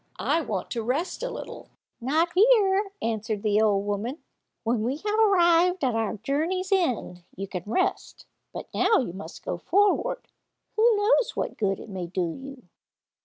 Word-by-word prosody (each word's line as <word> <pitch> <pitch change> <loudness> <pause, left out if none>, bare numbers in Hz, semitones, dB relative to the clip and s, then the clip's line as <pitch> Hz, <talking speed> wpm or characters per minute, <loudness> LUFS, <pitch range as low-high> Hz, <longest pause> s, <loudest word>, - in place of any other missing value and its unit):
I 330 - +1
want 205 - -4
to 235 - -2
rest 270 +11 -2
a - - -2
little." - - -8 0.3
"Not 310 +8 +2
here," 405 -1 +4
answered 220 -2 -2
the 210 0 +3
old 205 -2 +2
woman, 205 +7 -2 0.5
"when 230 0 0
we 250 +6 -1
have 420 +6 -1
arrived 360 -4 +4
at 255 -3 +2
our 225 -1 -1
journey's 325 - -1
end, 255 - 0
you 195 +2 -5
can 185 -2 -5
rest; 370 - -1 0.3
but - - -7
now 445 - +3
you 230 -10 -2
must 185 -3 -10
go 175 - -3
forward. 410 - +1 0.5
Who 450 +1 +4
knows 430 +3 +2
what - - -3
good 195 -3 -1
it - - -10
may 185 -3 -5
do 175 -2 -2
you?" 270 -1 -10
265 Hz, 170 wpm, -26 LUFS, -, 0.5 s, here